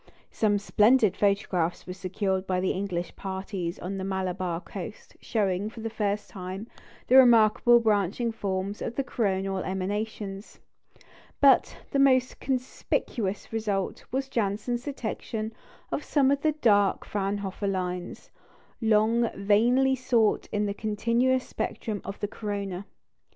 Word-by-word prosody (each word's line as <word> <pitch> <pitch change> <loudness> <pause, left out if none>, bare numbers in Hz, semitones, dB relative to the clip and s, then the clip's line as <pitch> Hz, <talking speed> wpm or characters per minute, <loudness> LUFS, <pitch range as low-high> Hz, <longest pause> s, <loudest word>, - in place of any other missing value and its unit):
Some 210 -2 +2
splendid 210 +1 +4
photographs 185 -4 0
were 180 - -6
secured 190 0 -2
by 185 -1 +1
the 185 - +1
English 180 -3 -3
parties 190 -2 -4
on 195 +2 -5
the - - -3
Malabar 185 -2 -2
coast, - - -9
showing, 205 -2 0
for 225 0 -10
the 225 0 -4
first 205 -1 -1
time, 185 +2 -6 0.4
the 255 - +6
remarkable 240 -1 +6
branching 215 +1 +1
forms 200 -2 -3
of 230 - -4
the 275 - 0
coronal 195 -6 -1
emanations; 195 +2 -4 0.8
but 275 -1 +5
the 280 - +1
most 260 -2 +3
conspicuous 245 -5 -2
result 205 -4 -2
was 265 +2 -1
Janssen's 230 +1 -1
detection 225 -5 -4 0.4
of 295 - -2
some 275 -2 +3
of 280 0 +1
the 310 0 +2
dark 205 -9 +3
Fraunhofer 200 0 -2
lines, 180 -2 -4 0.5
long 225 +1 +3
vainly 240 +7 +3
sought 240 -4 +2
in 210 0 0
the 200 - -1
continuous 235 +5 +1
spectrum 210 -3 -4
of 195 - -7
the 205 - 0
corona. 200 -2 -4
205 Hz, 130 wpm, -27 LUFS, 190-235 Hz, 0.8 s, the